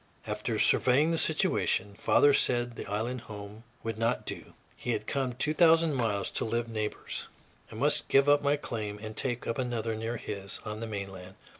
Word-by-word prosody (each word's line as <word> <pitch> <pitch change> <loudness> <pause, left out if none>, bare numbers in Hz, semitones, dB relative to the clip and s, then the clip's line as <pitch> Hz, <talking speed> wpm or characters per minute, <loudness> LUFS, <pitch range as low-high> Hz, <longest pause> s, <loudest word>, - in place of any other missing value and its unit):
After - - -2
surveying 135 +6 +4
the 165 - +1
situation, 100 - +1
father 145 +7 +4
said 120 -3 +1
the - - -7
island 115 +5 -2
home 105 +1 -9 0.2
would 115 -1 -4
not 115 0 0
do. - - -6 0.2
He 120 - -2
had 105 - -3
come 130 -1 -1
two 145 +5 0
thousand 165 -1 +5
miles 110 -6 0
to - - -1
live 115 +1 -1
neighbors; 110 -2 -4 0.4
I - - -9
must - - +2
give 135 +1 +5
up 145 0 +5
my 145 0 +3
claim 110 -7 -4
and 110 +1 -8
take 120 -2 -1
up 115 - -2
another 120 -3 -1
near 115 +2 -3
his, 100 -2 -5
on 105 0 -5
the 115 - -4
mainland. 95 -3 -6
115 Hz, 185 wpm, -30 LUFS, 105-130 Hz, 0.4 s, thousand